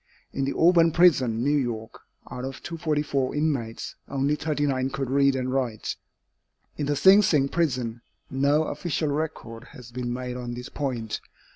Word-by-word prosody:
In 135 - -1
the 140 - -2
Auburn 170 -1 +5
prison, 130 -10 +4
New 145 +2 +2
York, 120 -5 -3 0.3
out 125 - -5
of 135 0 -6
244 150 -5 -1
inmates, 140 -7 -2 0.2
only 140 +1 +1
39 145 -4 0
could 135 -1 -3
read 140 0 +4
and 130 0 -2
write. 125 -5 -2 0.8
In 145 - -3
the 145 - +1
Sing 190 +8 +7
Sing 150 -8 +3
prison, 125 -8 -1 0.3
no 140 +3 +2
official 160 -1 -2
record 145 -6 -4
has 120 -2 -12
been 120 0 -3
made 125 0 -4
on 120 -1 -5
this 125 +1 -7
point. 120 -6 -3
135 Hz, 155 wpm, -26 LUFS, 125-150 Hz, 0.8 s, Sing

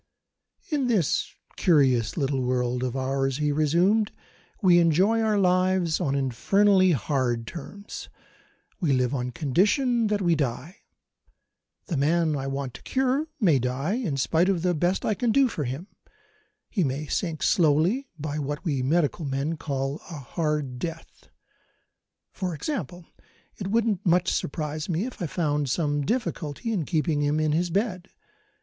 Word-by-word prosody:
"In 285 -4 +1
this 205 - +1 0.3
curious 130 -9 +3
little 135 -3 0
world 125 0 0
of 130 -1 -2
ours," 135 0 -1
he 150 -1 +1
resumed, 175 +9 +2 0.5
"we 180 -5 +5
enjoy 185 +7 +3
our 215 -2 +2
lives 185 -3 +2
on 140 -1 0
infernally 185 - +3
hard 125 -4 -1
terms. 190 - -8 0.7
We 160 -9 +1
live 125 0 +1
on 125 -2 -2
condition 210 - +1
that 210 -1 0
we 170 -1 +3
die. 145 - -3 1.1
The 165 - -2
man 160 +2 +2
I 135 -1 -3
want 135 -2 -3
to - - -11
cure 265 +3 0
may 170 - +4
die, 130 - -1
in 215 - -2
spite 165 +7 +2
of 180 -4 0
the 180 -1 +2
best 175 +4 0
I 215 - +2
can 240 +2 0
do 275 +2 +4
for 155 - -3
him 135 +8 -4 0.8
he 195 - 0
may 140 +1 -2
sink 165 0 -2
slowly, 175 - +2
by 150 0 -4
what 145 +4 -4
we 140 -6 0
medical 160 +4 +1
men 140 +3 -2
call 140 -2 -3
a 165 - -6
hard 145 -2 -2
death. 165 +1 -7 1.0
For 180 -4 -3
example, 175 - -4 0.5
it 195 - -4
wouldn't 215 -2 +1
much 180 +1 +2
surprise 150 +2 -3
me 175 +5 0
if 255 - -8
I 175 - -1
found 145 -2 -1
some 145 0 0
difficulty 220 - -2
in 175 -8 -1
keeping 155 -1 0
him 145 +1 +1
in 155 -1 +1
his 170 +3 +1
bed. 190 -1 -2
160 Hz, 155 wpm, -26 LUFS, 140-190 Hz, 1.1 s, we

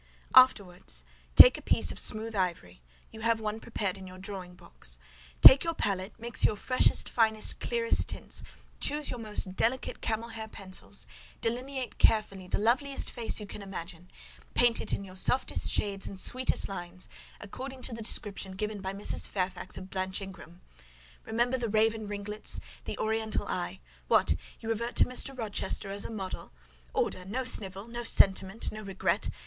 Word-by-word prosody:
"Afterwards, 180 - +4 0.3
take - - +10
a - - -13
piece - - +2
of - - -1
smooth 220 +1 +1
ivory—you 90 - -5
have 230 0 +1
one 215 0 -3
prepared 200 -4 -3
in 190 - -10
your 185 0 -11
drawing 185 -2 -8
box: - - -7 0.5
take 265 - +11
your 330 -1 -1
palette, 195 -1 -3
mix 235 +1 0
your - - +4
freshest, 255 +5 +2
finest, 220 -2 +1
clearest 470 -1 +1
tints; - - -4 0.4
choose 295 0 0
your 245 - -5
most 210 -4 -2
delicate 245 +5 -1
camel 225 +1 -2
hair 225 -1 -7
pencils; 195 -1 -7 0.3
delineate 255 +3 -3
carefully 195 -4 +2
the - - 0
loveliest 265 +6 +1
face 230 -2 +3
you 210 - -6
can 205 - -8
imagine; 180 -2 -8 0.5
paint 240 -1 +4
it - - 0
in - - -2
your 185 -1 -11
softest 250 +7 +3
shades 200 -1 -1
and 195 - -6
sweetest 255 +6 +1
lines, 180 -1 -6 0.3
according 260 +5 -8
to 240 - -2
the 230 - -6
description 200 -3 -1
given 210 +1 -4
by 190 0 -4
Mrs. 200 +1 +1
Fairfax 185 -1 -3
of 185 0 -9
Blanche 185 0 -2
Ingram; 190 -3 -11 0.6
remember 240 +3 0
the 235 -2 -2
raven 220 0 +1
ringlets, 205 +1 -3 0.3
the - - -4
oriental 220 0 -1
eye;—What! - - -1 0.3
you 225 - -6
revert 235 +2 -2
to - - +5
Mr. 260 +1 0
Rochester 210 -3 -2
as 200 0 -3
a - - -4
model! 195 -4 -5 0.4
Order! 185 - -1
No 230 +8 -3
snivel!—no 215 +1 -1
sentiment!—no 195 +1 +2
regret! 195 -2 -1
210 Hz, 160 wpm, -29 LUFS, 190-230 Hz, 0.6 s, take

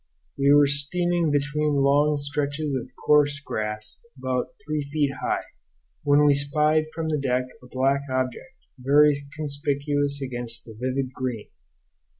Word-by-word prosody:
We 140 0 +3
were 145 0 +7
steaming 170 +4 +1
between 145 +1 0
long 145 +2 +3
stretches 145 +1 -2
of 130 -2 -3 0.2
coarse 145 -1 +4
grass, 105 -5 -5 0.2
about 130 -1 -2
three 150 0 -1
feet 145 -2 +1
high, - - -1 0.6
when 145 +1 +4
we 145 - +6
spied 150 +2 +2
from 160 0 -3
the 150 -1 0
deck 125 -2 0 0.2
a 125 - -14
black 135 +2 +1
object, 130 - -3 0.2
very 145 +3 +5 0.2
conspicuous 145 -1 -1
against 120 -3 -4
the 115 - -11
vivid 130 +3 -3
green. 125 -5 -4
140 Hz, 140 wpm, -25 LUFS, 130-150 Hz, 0.6 s, were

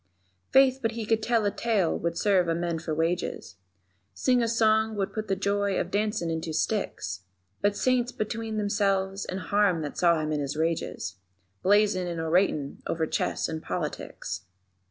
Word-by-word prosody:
_ - - -44
Faith, 265 -1 +5
but 225 -1 0
he 225 -1 -4
could 225 +1 +1
tell 230 -1 +2
a 205 - +2
tale 210 -8 +1
would 170 0 -2
serve 190 -2 +3
a 165 - +1
man 170 -1 -1
for 160 0 -5
wages, 165 - -2 0.6
Sing 250 -2 +2
a 230 - +1
song 220 -1 +3
would 195 -2 -2
put 215 -1 -3
the 195 - +1
joy 200 0 0
of 175 - -3
dancin' 205 -5 0
in 160 0 -2
two 160 -1 -4
sticks; 100 - -2 0.4
But 205 0 +2
Saints 250 -1 +2
between 220 0 -3
themselves 195 -2 0
and 185 - -4
harm 195 -4 +2
that 145 - -5
saw 170 -2 +4
him 155 0 -2
in 150 - 0
his 145 +1 -3
rages, 160 - -2 0.4
Blazin' 200 -2 +3
and 170 -1 -3
oratin' 160 -3 +1
over 160 -1 0
chess - - -1
and 160 -1 -4
politics. - - -4
195 Hz, 180 wpm, -27 LUFS, 165-215 Hz, 0.6 s, Faith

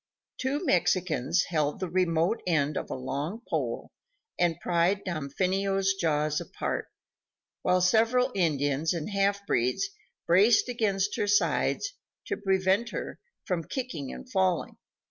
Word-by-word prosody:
Two 280 +6 -1
Mexicans 175 - +2
held 150 -3 0
the 185 - -2
remote 175 +2 +1
end 155 -3 +1
of - - -3
a - - -3
long 145 - -4
pole - - -2 0.5
and 175 -1 +2
pried 175 +3 +1
Damfino's 190 +5 0
jaws 155 -5 0
apart, - - -3 0.7
while 180 0 +2
several 230 +7 +3
Indians 150 -2 +1
and 165 +4 -4
halfbreeds 200 - +1 0.3
braced 205 +8 +5
against 205 -5 0
her 205 - 0
sides 205 - +1 0.3
to - - -2
prevent 195 +3 +1
her - - -5 0.3
from 180 -4 -1
kicking 240 - -4
and 260 - -9
falling. 190 -7 0
185 Hz, 125 wpm, -28 LUFS, 160-205 Hz, 0.7 s, braced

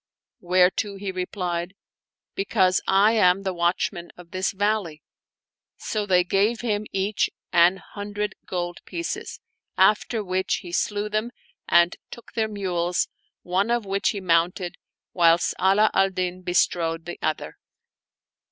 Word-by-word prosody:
whereto 185 +3 +2
he 195 0 -4
replied, 180 -1 -3 0.3
" - - -69
Be 195 - -1
cause 190 -4 +2
I 195 +3 +5
am 195 -3 +3
the 190 -1 -2
watchman 175 0 -1
of 175 -1 -14
this 185 0 -1
valley." 200 -6 -1 0.7
So 210 -2 -3
they 180 -2 +4
gave 200 +6 +1
him 215 -3 -1
each 195 +2 0 0.2
an 175 +2 +5
hundred 205 +1 -5
gold 175 -1 -3
pieces, 340 0 -5 0.4
after 210 +3 +3
which 185 0 -1
he 175 - -7
slew 205 +3 -1
them 215 +2 -1 0.4
and 170 +1 +4
took 235 - -12
their 220 -1 0
mules, 180 -4 -1 0.3
one 190 +5 0
of 240 -2 0
which 195 0 0
he 205 - -2
mounted, 175 0 0 0.3
whilst 170 -1 +4
Ala 200 +3 +4
al 195 0 +3
Din 185 -1 -3
bestrode 170 -2 0
the 175 - -7
other. 155 0 -3
190 Hz, 140 wpm, -24 LUFS, 175-205 Hz, 0.7 s, I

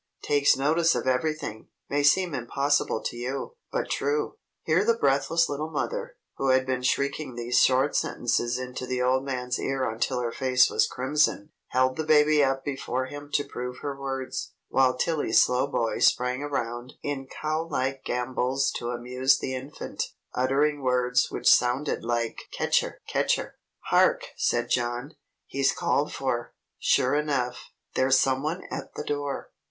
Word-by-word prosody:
Takes 145 -2 +3
notice 160 +5 +3
of - - -2
everything. 130 -3 -1 0.2
May 145 +1 0
seem 170 +4 +3
impossible 140 0 0
to - - -3
you, 130 +3 -4 0.2
but - - -2
true." 145 +2 -1 0.3
Here 165 +5 +3
the 230 +1 +2
breathless 140 +2 +2
little 150 +2 -3
mother, - - -3 0.2
who 135 - -1
had 130 0 +4
been 130 -1 -1
shrieking 140 +1 -1
these 120 +1 +1
short 130 +2 +3
sentences 120 0 0
into 125 0 -5
the 125 0 -1
old 130 +1 +2
man's 125 -2 -3
ear 135 -1 -1
until 115 +3 -1
her 120 -1 -2
face 125 0 +3
was - - +3
crimson, 130 -4 0 0.2
held 130 0 +1
the 160 - -1
baby 155 -1 +5
up 135 0 0
before 130 -2 -2
him 145 +2 -9
to 145 - +2
prove 125 -2 -6
her 140 -1 -3
words, 135 -1 -4 0.2
while 130 -1 +3
Tilly 155 -5 0
Slowboy 125 -1 +2
sprang 125 +2 +2
around 120 -3 -3
in 135 -2 -3
cow 155 +4 -3
like 135 -2 -2
gambols 125 +2 0
to 120 - -4
amuse 125 +2 +1
the 130 - -4
infant, 135 +3 -5 0.3
uttering 140 +3 +1
words 125 -1 +2
which - - -3
sounded 125 +4 +3
like 115 -1 -1
"Ketcher! - - 0
Ketcher!" - - 0 0.3
"Hark!" - - +3
said 120 0 0
John. 120 +4 -1 0.3
"He's 135 0 +1
called 145 - 0
for, 120 -3 -3 0.2
sure 125 - +3
enough. 140 -5 -1 0.2
There's 130 0 +4
some 130 0 +2
one 160 +5 -3
at - - -6
the - - -4
door. 145 -1 -3
135 Hz, 155 wpm, -26 LUFS, 125-145 Hz, 0.3 s, baby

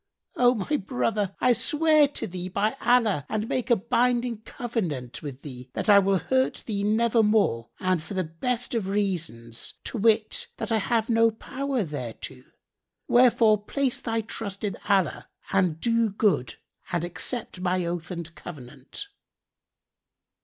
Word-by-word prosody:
O 245 0 +4
my 245 +8 0
brother, 205 -3 -1
I 250 - +4
swear 305 +4 +4
to 285 - -4
thee 180 0 -5
by 205 +4 0
Allah 230 - +3
and 215 0 -1
make 255 +1 -2
a 240 - +6
binding 235 +1 +1
covenant 180 - -4
with 140 -3 -8
thee 130 -3 -9
that - - -2
I 200 -1 +9
will 195 0 +2
hurt 260 +7 0
thee 200 -3 -2
nevermore 215 - +2
and 185 -3 +1
for 195 +5 -8
the 185 - +1
best 235 +11 -3
of 220 -5 -1
reasons, 170 - -3
to 235 - -3
wit, 220 0 +2
that - - -4
I 220 - +3
have 225 +2 0
no 230 -1 +4
power 260 +2 -3
thereto; 140 -8 -6 0.7
wherefore 230 -4 +5
place 270 +3 -1
thy 225 -1 -1
trust 205 -2 -6
in 205 -2 -1
Allah 195 -5 +1 0.2
and 180 -5 +2
do 230 +2 +2
good 190 - +1 0.4
and 175 -2 0
accept 185 +3 -5
my 180 -1 0
oath 170 -1 -4
and 170 -2 -6
covenant." 145 - -9
210 Hz, 150 wpm, -26 LUFS, 175-235 Hz, 0.7 s, I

